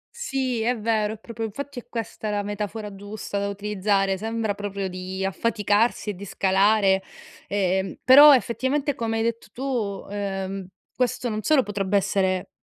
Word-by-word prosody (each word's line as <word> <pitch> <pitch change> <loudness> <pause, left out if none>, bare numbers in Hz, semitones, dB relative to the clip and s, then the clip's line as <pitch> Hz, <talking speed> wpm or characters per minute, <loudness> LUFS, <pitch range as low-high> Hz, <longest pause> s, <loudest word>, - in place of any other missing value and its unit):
Sì, 265 - -2
è 245 +2 +1
vero, 215 -1 0
è - - -14
proprio 225 +1 -7
infatti 275 +5 -5
è - - -15
questa 225 -2 -4
la 205 -1 -1
metafora 205 +1 -4
giusta 205 +1 -5
da 200 - -1
utilizzare, 200 -1 0
sembra 220 0 -1
proprio 200 -1 -4
di 185 +1 -4
affaticarsi 210 +2 +1
e - - -6
di 190 +1 -10
scalare. 195 0 +3 0.5
Ehm, 190 -1 0
però 285 +4 +10
effettivamente, 265 +4 0
come 225 -2 -2
hai 225 - 0
detto 230 0 -2
tu, 240 -7 -3
ehm, 195 -1 -4 0.3
questo 250 0 0
non 215 -1 -2
solo 275 +4 +3
potrebbe 200 -1 0
essere 190 -1 0
210 Hz, 155 wpm, -24 LUFS, 195-230 Hz, 0.5 s, però